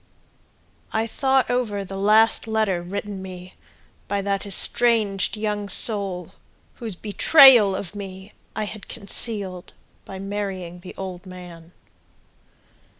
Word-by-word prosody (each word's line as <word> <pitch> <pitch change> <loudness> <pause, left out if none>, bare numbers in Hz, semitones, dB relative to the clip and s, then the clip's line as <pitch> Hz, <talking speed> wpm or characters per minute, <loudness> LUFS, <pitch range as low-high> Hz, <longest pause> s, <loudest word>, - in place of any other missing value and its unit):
I 220 +1 -1
thought 265 +3 0
over 215 -5 -2
the 195 - -9
last 215 +4 +2
letter 215 -5 -1
written 200 +2 -6
me 185 -1 -10 0.5
By 200 0 -2
that 200 0 -3
estranged 205 -1 +3
young 210 -1 -4
soul 195 -3 +3 0.5
Whose 225 -6 -6
betrayal 220 - +5
of 190 -2 -7
me 195 0 -10 0.2
I 215 - -3
had 210 0 -8
concealed 200 -3 -3 0.3
By 190 - -9
marrying 190 -3 -6
the 180 - -12
old 185 -1 -8
man. 175 -2 -12
200 Hz, 115 wpm, -22 LUFS, 185-215 Hz, 0.5 s, betrayal